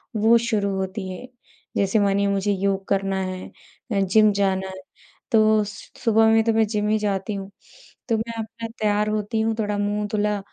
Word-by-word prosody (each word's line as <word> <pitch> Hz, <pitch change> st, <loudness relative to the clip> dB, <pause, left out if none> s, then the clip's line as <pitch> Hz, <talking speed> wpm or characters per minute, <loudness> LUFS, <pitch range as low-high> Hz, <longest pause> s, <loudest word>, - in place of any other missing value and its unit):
वो 225 Hz, +2 st, +5 dB
शुरू 220 Hz, -4 st, 0 dB
होती 190 Hz, +1 st, -3 dB
है। 185 Hz, +7 st, -8 dB, 0.5 s
जैसे 200 Hz, +2 st, +2 dB
मानिए, 200 Hz, 0 st, +2 dB
मुझे 200 Hz, +1 st, 0 dB
योग 195 Hz, 0 st, -1 dB
करना 195 Hz, -1 st, 0 dB
है 185 Hz, 0 st, -4 dB, 0.5 s
या 200 Hz, -2 st, +2 dB
जिम 210 Hz, +3 st, +4 dB
जाना 190 Hz, -1 st, 0 dB
है, 190 Hz, 0 st, -8 dB, 0.5 s
तो 215 Hz, -1 st, +4 dB
स 205 Hz, 0 st, -9 dB
सुबह 225 Hz, -1 st, +4 dB
में 225 Hz, 0 st, +4 dB
तो 225 Hz, 0 st, +1 dB
मैं 220 Hz, 0 st, +3 dB
जिम 210 Hz, -1 st, -1 dB
ही 215 Hz, -, +3 dB
जाती 205 Hz, 0 st, -2 dB
हूँ। 195 Hz, 0 st, -6 dB, 0.6 s
तो 225 Hz, -, +2 dB
मैं 230 Hz, +1 st, -4 dB
अपना 225 Hz, +1 st, -6 dB
तैयार 210 Hz, 0 st, +1 dB
होती 215 Hz, +1 st, -1 dB
हूँ, 225 Hz, 0 st, 0 dB
थोड़ा 210 Hz, -1 st, -1 dB
मुँह 205 Hz, +1 st, -1 dB
धुला, 210 Hz, -1 st, 0 dB
210 Hz, 190 wpm, -23 LUFS, 195-220 Hz, 0.6 s, वो